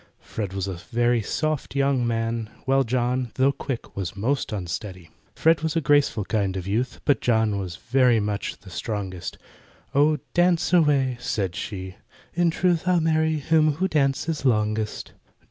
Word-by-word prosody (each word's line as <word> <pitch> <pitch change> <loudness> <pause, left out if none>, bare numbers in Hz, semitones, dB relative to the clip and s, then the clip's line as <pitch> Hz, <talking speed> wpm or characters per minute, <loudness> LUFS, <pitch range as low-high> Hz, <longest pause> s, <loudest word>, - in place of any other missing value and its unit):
FRED 100 -4 -5
was 95 -1 -2
a 95 - -3
very 120 +6 0
soft 155 +7 -2
young 135 -3 +2
man, 115 -1 -1 0.2
While 135 +1 +3
JOHN, 125 0 -1
though 135 +1 +3
quick, 135 -3 -6
was 95 -2 -4
most 125 +8 -1
unsteady. 90 -3 -5 0.2
FRED 160 -1 +3
was 160 0 -1
a - - +3
graceful 145 -8 +2
kind 100 -4 -1
of 90 - -5
youth, 115 +4 -1
But 145 - +3
JOHN 110 -4 +2
was 90 -3 -5
very 125 0 +3
much 105 -1 -3
the 95 - -13
strongest. 95 -3 -4 0.6
"Oh, 150 +2 +4 0.2
dance 175 0 +2
away," 140 -7 +3
said 95 -7 -2
she, 95 -2 -6 0.4
"in 175 0 +2
truth, 175 +1 +1
I'll 180 -1 +4
marry 160 -1 +2
him 155 +1 +3
who 185 +6 0
dances 150 0 0
longest." 110 -3 0
125 Hz, 160 wpm, -24 LUFS, 105-150 Hz, 0.6 s, Oh